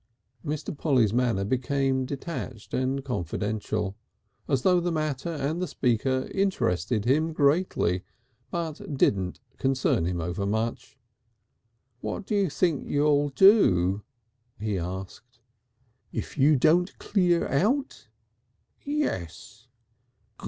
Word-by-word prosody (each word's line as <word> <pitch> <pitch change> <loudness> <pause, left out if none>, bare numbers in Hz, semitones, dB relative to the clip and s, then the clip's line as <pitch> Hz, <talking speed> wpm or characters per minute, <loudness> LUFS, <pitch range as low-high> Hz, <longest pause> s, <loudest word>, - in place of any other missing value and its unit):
Mr. 150 0 -4
Polly's 130 -9 +2
manner 120 -5 +1
became 130 +3 0
detached 140 -6 -6
and 130 +1 -1
confidential 105 - -2 0.5
as 135 -3 +1
though 180 -1 +4
the 175 0 -1
matter 155 -1 -2
and 155 +2 -2
the 185 - -1
speaker 130 0 0
interested 115 - 0
him 155 +6 +2
greatly, 145 - +2 0.5
but 160 -4 -4
didn't 95 -7 +1 0.2
concern 130 -10 +1
him 90 -1 -2
over 90 +4 -3
much. 115 +5 -2 1.0
"What 190 - -4
do - - -3
you 200 -3 +2
think 160 -1 0
you'll 145 0 +2
do?" 105 - +5 0.6
he 105 -2 -1
asked. 95 +8 -7 0.7
"If - - -5
you 150 +2 +5
don't 165 +7 +3
clear 180 -4 +1
out?" 255 - 0 0.8
"Yes." 285 - -4
135 Hz, 110 wpm, -27 LUFS, 110-160 Hz, 1.0 s, do